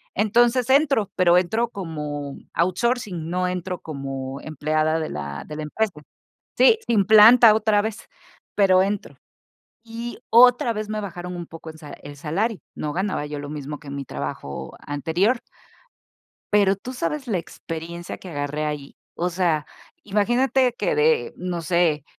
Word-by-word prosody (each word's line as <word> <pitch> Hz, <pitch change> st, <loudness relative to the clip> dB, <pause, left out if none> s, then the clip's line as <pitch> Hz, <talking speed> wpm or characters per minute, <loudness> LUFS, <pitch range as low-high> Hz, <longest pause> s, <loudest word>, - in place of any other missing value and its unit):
Entonces 240 Hz, +4 st, +3 dB
entro, 275 Hz, -6 st, +3 dB
pero 180 Hz, -1 st, +5 dB
entro 220 Hz, +7 st, +1 dB
como 150 Hz, -8 st, -5 dB, 0.2 s
outsourcing, 185 Hz, -1 st, 0 dB
no 180 Hz, +1 st, 0 dB
entro 180 Hz, 0 st, -4 dB
como 135 Hz, -2 st, -5 dB
empleada 155 Hz, +1 st, 0 dB
de 155 Hz, -, -3 dB
la 70 Hz, -1 st, -5 dB
de 150 Hz, -, -8 dB
la 155 Hz, -, -4 dB
empresa. 210 Hz, +8 st, -1 dB, 0.7 s
Sí, 450 Hz, -, +6 dB
sin 220 Hz, -4 st, +3 dB
planta 220 Hz, +2 st, +8 dB
otra 215 Hz, -1 st, +2 dB
vez, 220 Hz, +1 st, -5 dB, 0.5 s
pero 190 Hz, -2 st, +5 dB
entro. 200 Hz, +1 st, -2 dB, 0.7 s
Y 230 Hz, +1 st, -7 dB
otra 245 Hz, 0 st, +6 dB
vez 215 Hz, -1 st, -4 dB
me 215 Hz, 0 st, -3 dB
bajaron 180 Hz, -2 st, -6 dB
un 175 Hz, -1 st, -6 dB
poco 165 Hz, 0 st, -10 dB
en 160 Hz, -, -10 dB
salario 150 Hz, -2 st, -11 dB
el 145 Hz, -, -9 dB
salario. 190 Hz, +9 st, -2 dB
No 150 Hz, -1 st, -4 dB
ganaba 190 Hz, -4 st, -1 dB
yo 150 Hz, 0 st, -6 dB
lo 145 Hz, 0 st, -7 dB
mismo 150 Hz, 0 st, -6 dB
que 150 Hz, -, -15 dB
en 140 Hz, -, -6 dB
mi 140 Hz, -1 st, -5 dB
trabajo 65 Hz, -, -6 dB
anterior. 170 Hz, -, 0 dB, 1.1 s
Pero 200 Hz, -2 st, +4 dB
tú 245 Hz, +6 st, -8 dB
sabes 280 Hz, +2 st, -3 dB
la 200 Hz, -6 st, 0 dB
experiencia 165 Hz, +1 st, -7 dB
que 185 Hz, -, -10 dB
agarré 145 Hz, -1 st, -3 dB
ahí. 150 Hz, -2 st, -4 dB, 0.2 s
O 175 Hz, +1 st, -1 dB
sea, 165 Hz, -4 st, +1 dB, 0.4 s
imagínate 240 Hz, +5 st, +2 dB
que -, -, -1 dB
de, 460 Hz, +1 st, +2 dB
no 175 Hz, -2 st, -4 dB
sé, 165 Hz, -4 st, +1 dB
180 Hz, 155 wpm, -23 LUFS, 155-220 Hz, 1.1 s, planta